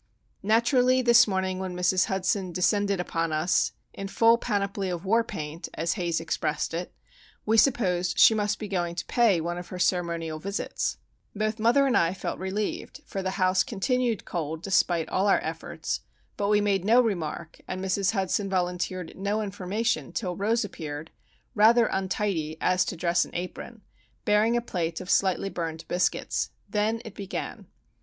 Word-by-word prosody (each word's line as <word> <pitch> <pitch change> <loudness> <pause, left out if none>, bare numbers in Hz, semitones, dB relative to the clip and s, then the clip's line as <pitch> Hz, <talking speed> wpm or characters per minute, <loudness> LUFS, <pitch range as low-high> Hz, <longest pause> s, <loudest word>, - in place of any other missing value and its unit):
Naturally 250 +4 +3
this 235 0 +6
morning 190 -1 -1
when 185 -1 -4
Mrs. 180 +1 +2
Hudson 190 0 -1
descended 200 +2 +1
upon 165 -2 -1
us 155 +4 +2 0.2
"in 195 - -5
full 230 +3 +4
panoply 200 -2 -1
of 175 +1 -4
war 225 +4 +3
paint," 160 -6 -6
as 165 +1 0
Haze 175 -5 -1
expressed 165 -1 -2
it, 175 +2 -4 0.5
we 220 - +2
supposed 185 -8 +2
she - - +8
must 210 -1 0
be 215 - -6
going 175 -3 -2
to 170 - -4
pay 230 -7 +3
one 175 +2 -3
of 175 - -8
her 185 - -7
ceremonial 170 -3 0
visits. 200 +5 -3 0.4
Both 215 +1 -1
mother 240 +5 +4
and 265 - +2
I 170 +2 +2
felt - - -4
relieved, 195 +3 -3
for 195 - -4
the 190 - -1
house 185 -1 +3
continued 235 +1 -1
cold 160 -1 -4
despite 175 -4 +2
all 190 +2 +1
our 200 - +5
efforts; - - -4 0.4
but 200 - -1
we 210 0 +4
made 200 -3 +1
no 225 +5 +5
remark, 170 -8 -2
and 185 - -4
Mrs. 190 +1 +1
Hudson 195 0 0
volunteered 180 -1 -2
no 205 +3 -1
information 205 +3 -2
till 180 -5 -2
Rose 220 +4 +1
appeared, 155 -4 -7 0.4
rather 230 +2 +5
untidy 190 -6 -1
as 185 0 +2
to 180 - -4
dress 175 +1 +2
and - - -11
apron, 185 +5 -6 0.4
bearing 215 +3 +3
a - - 0
plate 170 -7 -3
of 185 0 -4
slightly 195 0 +2
burned 165 -2 -4
biscuits. 180 +1 0 0.2
Then 220 +2 0
it 220 - -8
began. 200 -2 -6
190 Hz, 165 wpm, -27 LUFS, 175-215 Hz, 0.5 s, she